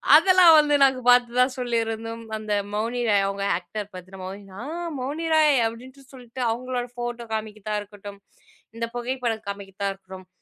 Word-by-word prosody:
அதெல்லாம் 370 -3 +7
வந்து 295 -1 +3
நாங்க 265 -1 +4
பார்த்ததா 245 0 +5
சொல்லியிருந்தோம். 230 -1 -2
அந்த 215 -1 -3 0.2
மௌனி 230 +3 -1
ராய் 200 -1 +3
அவங்க 200 0 -3 0.2
ஆக்டர் 205 +3 -7
பார்த்தினா, 185 +1 -10
மௌனி 195 +2 -8 0.2
ஆ - - -6 0.4
மௌனி 295 +6 -3
ராய்! 305 -3 +5
அப்படின்ட்டு 260 +4 -11
சொல்லிட்டு, 250 0 -9
அவங்களோட 250 +1 -3
ஃபோட்டோ 240 -1 -5
காமிக்கறதா 215 -1 -4
இருக்கட்டும். 205 -1 -11 0.6
இந்த 230 - -1
புகைப்படம் 240 -3 -3
காமிக்கறதா 200 0 -4
இருக்கட்டும். 190 -1 -13
230 Hz, 145 wpm, -24 LUFS, 205-250 Hz, 0.6 s, அதெல்லாம்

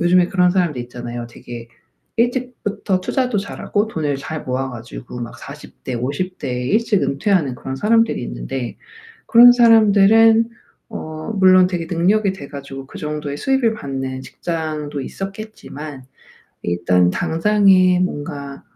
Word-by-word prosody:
요즘에 175 +1 +4
그런 180 -2 +3
사람들 175 -8 0
있잖아요. 120 -1 -7
되게 120 0 -10 0.5
일찍부터 235 -5 -1
투자도 250 +3 -1
잘하고 205 +1 -2
돈을 150 -8 -2
잘 155 +3 -6
모아 130 +1 -2
가지고 120 +1 -9
막 115 - -7
40 - - -12
대 130 - -4
50 145 +10 -3
대에 125 -3 -3
일찍 215 0 +2
은퇴하는 140 +1 +1
그런 130 0 -6
사람들이 225 +7 +2
있는데 - - -5 0.5
그런 240 +1 +9
사람들은 225 0 +5 0.4
어 155 -4 -6
물론 185 -1 +6
되게 170 -3 -3
능력이 190 +4 +2
돼 165 -7 -9
가지고 135 -1 -8
그 - - -11
정도의 150 -1 -4
수익을 260 - +1
받는 135 -6 -5
직장도 155 -2 -4
있었겠지만 195 -7 -8 0.6
일단 90 +1 +2
당장에 185 - +3
뭔가 145 -5 -4
165 Hz, 300 characters per minute, -19 LUFS, 135-205 Hz, 0.6 s, 그런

